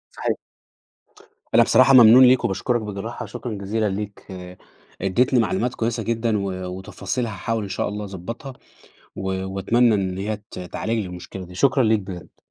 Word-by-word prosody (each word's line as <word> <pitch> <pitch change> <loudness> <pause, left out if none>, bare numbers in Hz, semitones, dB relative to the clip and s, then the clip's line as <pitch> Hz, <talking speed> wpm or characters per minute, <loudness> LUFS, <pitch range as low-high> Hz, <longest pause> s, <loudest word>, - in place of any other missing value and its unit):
صحيح. - - -1 1.2
أنا - - +8
بصراحة 130 +1 +5
ممنون 125 0 +9
ليك 125 0 +5
وباشكرك 120 +4 0
بجراحة، 105 +2 -6
شكرًا 120 -3 -6
جزيلًا 105 +2 -1
ليك، 100 +1 -6 0.7
إدّيتني 120 +7 +2
معلومات 115 +3 0
كويسة 115 0 -2
جدًا 115 0 0
و 100 -1 -2 0.3
وتفاصيل 95 +4 -4
هاحاول 110 +1 -3
إن 100 - -6
شاء - - -2
الله 105 0 -5
أضبّطها 100 - -7 0.6
و 95 0 -4 0.2
وأتمنى 110 +4 +2
إن 95 -2 -2
هي 105 +2 -2
ت - - -7
تعالج 90 +5 -4
لي 105 - -3
المشكلة 90 +1 -8
دي. 90 - -13
شكرًا 135 +4 +3
ليك 110 -1 +3
بجد. 95 -3 -10
105 Hz, 160 wpm, -22 LUFS, 95-120 Hz, 1.2 s, ممنون